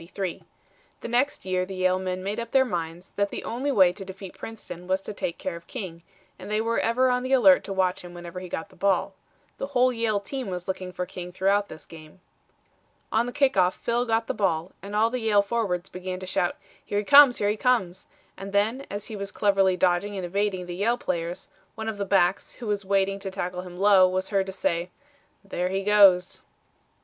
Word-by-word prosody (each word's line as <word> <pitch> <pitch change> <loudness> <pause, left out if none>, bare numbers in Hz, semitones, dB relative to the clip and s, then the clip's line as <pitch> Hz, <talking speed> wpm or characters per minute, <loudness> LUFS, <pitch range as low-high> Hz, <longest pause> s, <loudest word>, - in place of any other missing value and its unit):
The 180 +1 -5 0.7
next 250 +2 0
year 185 -1 0
the 190 +1 -6
Yale 185 0 +2
men 185 0 -3
made 200 +3 -2
up 235 -1 -5
their 265 +1 +4
minds 175 -3 -5
that 200 0 +1
the - - -6
only 260 +5 -2
way 185 -8 +5
to 195 +1 -8
defeat 190 0 -9
Princeton 180 -6 -9
was 190 +1 +1
to 210 - -7
take 170 -4 -4
care 185 - -4
of 170 0 -12
King, 185 -9 -7 0.4
and - - -9
they 210 0 +1
were 230 +1 0
ever 250 +3 +2
on 250 0 +1
the 255 +1 -1
alert 200 -8 +6
to - - -6
watch 185 -1 0
him 175 0 -10
whenever 175 +1 -7
he 180 -1 -8
got 160 - -5
the - - -19
ball. 195 0 +1 0.5
The 275 - -3
whole 255 +1 +4
Yale 225 -3 0
team 260 +5 -5
was 180 -2 -5
looking 185 -1 -4
for 180 0 -4
King 180 0 -8
throughout 200 +3 +1
this 155 -1 -11
game. 155 +1 -14 0.9
On 230 +2 +2
the - - -4
kick 270 +1 +2
off 185 -1 +3
Phil 240 +1 -1
got 225 0 +1
the - - -2
ball, 175 -3 0
and 200 +1 -7
all 225 +2 +3
the 250 - -2
Yale 210 -2 +3
forwards 200 -5 -1
began 185 0 -6
to 185 - -7
shout, 180 -1 0 0.3
"Here 205 - -3
he 205 - 0
comes, 280 -1 +8
here 205 - +1
he - - -1
comes," 210 -7 0 0.3
and 195 0 -8
then 220 +7 +1
as 205 +1 -5
he 220 - -7
was 200 -1 -5
cleverly 195 -2 +2
dodging 185 +3 +1
and 185 - -3
evading 190 0 -1
the 175 - -6
Yale 225 +6 +1
players, 170 -3 -3 0.3
one 220 -1 -5
of 215 -2 -4
the 200 - -1
backs, 190 -1 +2
who 245 - -9
was 205 -1 -1
waiting 195 0 +1
to 195 - -5
tackle 180 -1 -4
him 180 -1 -10
low, 195 -1 +6
was 185 +1 -2
heard 195 -2 +1
to - - -4
say, 175 -2 -1 0.5
"There 180 -2 -2
he 195 +1 -2
goes." 195 -3 +5
195 Hz, 225 wpm, -26 LUFS, 180-215 Hz, 0.9 s, comes